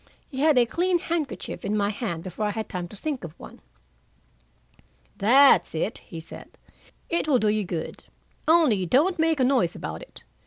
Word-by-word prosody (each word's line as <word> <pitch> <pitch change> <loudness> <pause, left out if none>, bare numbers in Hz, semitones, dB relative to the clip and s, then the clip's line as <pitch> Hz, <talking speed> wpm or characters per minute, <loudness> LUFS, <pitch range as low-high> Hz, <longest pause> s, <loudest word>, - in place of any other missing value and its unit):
He 265 - -6
had 300 -1 +4
a 245 - +6
clean 355 +8 +1
handkerchief 330 -4 -4
in 210 +1 -1
my 205 0 +1
hand 200 -7 -4
before 195 +3 -3
I - - -1
had 220 +1 -4
time 180 -2 -5
to 190 - -12
think 275 +3 -4
of 160 -2 -9
one. - - -12 1.6
"That's 265 -1 +5
it," 175 +7 -2
he 170 -6 -10
said. 160 - -11 0.5
"It 340 -2 -1
will 280 -4 +4
do 215 -3 +1
you 210 0 +1
good, 170 -2 -6 0.4
only 290 - +4
don't 320 - +2
make 320 -2 +2
a - - +3
noise 250 -10 +2
about 80 +1 -6
it. - - -13
230 Hz, 185 wpm, -25 LUFS, 190-305 Hz, 1.6 s, a